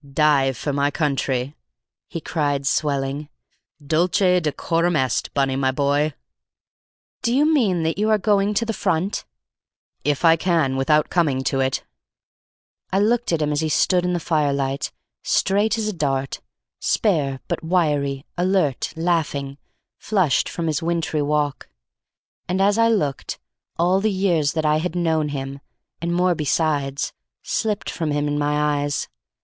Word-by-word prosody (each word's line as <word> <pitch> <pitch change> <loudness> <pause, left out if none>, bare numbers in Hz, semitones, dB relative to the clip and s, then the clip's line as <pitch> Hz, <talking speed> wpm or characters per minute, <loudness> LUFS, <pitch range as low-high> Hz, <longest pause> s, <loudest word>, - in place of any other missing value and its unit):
"Dye 145 -3 +3
for 140 +3 -3
my 140 +1 +2
country," 140 -3 -1 0.5
he 165 - -5
cried, 145 -4 -1
swelling. 140 +1 -1 0.6
"Dulce 170 +6 +2
et 180 -1 +4
decorum 165 +2 0
est, 130 -4 0
Bunny, 135 -1 +1
my 135 0 +1
boy!" 145 +2 +1 1.1
"Do 235 - 0
you 275 +4 +3
mean 225 - +2
that 160 +4 -1
you 215 +1 +2
are 215 - +4
going 205 0 +1
to 230 - +1
the 225 - -2
front?" 185 0 -1 0.8
"If 145 +3 0
I 165 0 +6
can 160 -6 +1
without 150 +3 +2
coming 145 -7 +1
to 135 - 0
it." 130 0 0 1.1
I 190 - +1
looked 230 +3 +2
at 160 -2 +1
him 150 - 0
as 150 +1 0
he 160 - 0
stood 180 +3 +2
in 180 0 0
the 175 - 0
firelight, 140 -4 0 0.3
straight 210 +3 +1
as 220 -1 -1
a 215 - -1
dart, 135 -5 -2 0.4
spare 145 -10 +1
but - - -3
wiry, 150 -5 0
alert, 180 -7 +1
laughing, 155 -5 -1 0.4
flushed 190 - +1
from 170 - -4
his 155 -3 0
wintry 165 -2 -1
walk; 145 -1 -1 0.8
and 185 +1 0
as 200 +3 +3
I 230 - +5
looked, 150 - -1 0.4
all 180 +3 +3
the 215 - +2
years 180 -7 +1
that 160 -1 -1
I 150 0 +3
had 175 +2 -3
known 160 -3 +1
him, 135 -1 -5 0.4
and 170 0 -1
more 180 +1 +2
besides, 145 -3 -1 0.3
slipped 210 -2 -2
from 160 -3 -3
him 145 0 0
in 145 0 -1
my 150 0 +1
eyes. 145 -1 -2
155 Hz, 155 wpm, -22 LUFS, 140-180 Hz, 1.1 s, I